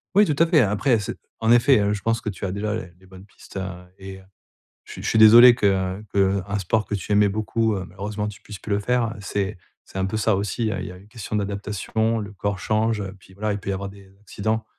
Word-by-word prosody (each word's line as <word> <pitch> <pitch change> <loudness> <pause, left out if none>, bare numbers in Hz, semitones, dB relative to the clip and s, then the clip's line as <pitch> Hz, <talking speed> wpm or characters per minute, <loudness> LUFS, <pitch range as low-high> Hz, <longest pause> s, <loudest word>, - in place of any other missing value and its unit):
Oui, 205 +1 +7
tout 150 -5 0
à 165 - +5
fait, 165 -4 +5
après, 110 +4 +2
c'est 105 - -5 0.2
en 115 0 +2
effet, 120 +1 +5
heu, 100 0 +1
je 105 - -4
pense 115 +3 0
que 110 - -4
tu 100 - -9
as 95 - -2
déjà, 105 +2 -2
heu, 90 -6 -5
les 95 - -20
bonnes 95 +1 -14
pistes, 100 - -13
heu 95 - -2 0.4
et 95 0 -8
heu, 95 - -15 0.6
je - - -10
je - - -5
suis 110 - +2
désolé 120 +3 +9
que, 110 - 0
heu 95 +1 0
que, 100 - -1
heu, 95 0 +2
un 105 - -1
sport 105 +3 0
que 105 - -3
tu 100 +2 -4
aimais 105 0 +5
beaucoup, 110 +2 0
heu, 95 - -4
malheureusement, 105 +4 -5
tu 105 -1 -8
puisses 105 -2 -9
plus 110 - -5
le 100 - +1
faire, 125 +3 +1
heu, - - -13
c'est 100 0 -3 0.3
c'est 95 - -9
un 95 - 0
peu 105 - -3
ça 110 0 +2
aussi, 105 +3 -1
heu, 100 - -3
il 90 - -5
y - - -8
a - - -12
une 95 +2 -16
question 110 -1 -5
d'adaptation, 105 +3 -1
le 105 -1 -6
corps 100 0 -3
change, 110 +2 0
heu, 95 -1 -6
puis 95 - -18
voilà, 105 +2 -2
il 100 - -4
peut 100 - -4
y - - 0
avoir 100 +1 -4
des 100 -1 -15
accidents, 110 +2 -2
105 Hz, 280 wpm, -23 LUFS, 95-110 Hz, 0.6 s, désolé